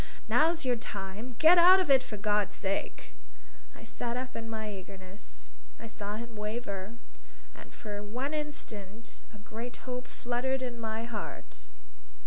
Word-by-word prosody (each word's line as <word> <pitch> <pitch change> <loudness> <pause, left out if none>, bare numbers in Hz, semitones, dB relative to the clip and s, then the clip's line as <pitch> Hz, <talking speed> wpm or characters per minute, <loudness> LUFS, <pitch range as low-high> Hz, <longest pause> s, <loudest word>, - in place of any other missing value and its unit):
Now's 330 -1 +4
your 250 -2 +3
time. 210 +3 -5
Get 340 +3 +9
out 365 +2 +10
of 365 -6 +2
it, 265 -1 +8
for 215 -4 -6
God's 205 0 +2
sake!" 195 0 -2 0.6
I - - -12
sat 240 0 -3
up 255 0 -4
in 225 0 -4
my 220 -1 -3
eagerness. 190 0 -10 0.3
I - - -8
saw 210 -2 -4
him 235 +1 -6
waver. 210 -1 -3 0.6
And - - -12
for 205 -2 -6
one 250 +8 -3
instant 230 -8 -5
a 215 - -12
great 225 +3 -7
hope 250 -1 -3
fluttered 260 +2 -1
in 240 -2 -4
my 220 0 -2
heart. 205 - -6
225 Hz, 150 wpm, -31 LUFS, 205-255 Hz, 0.6 s, out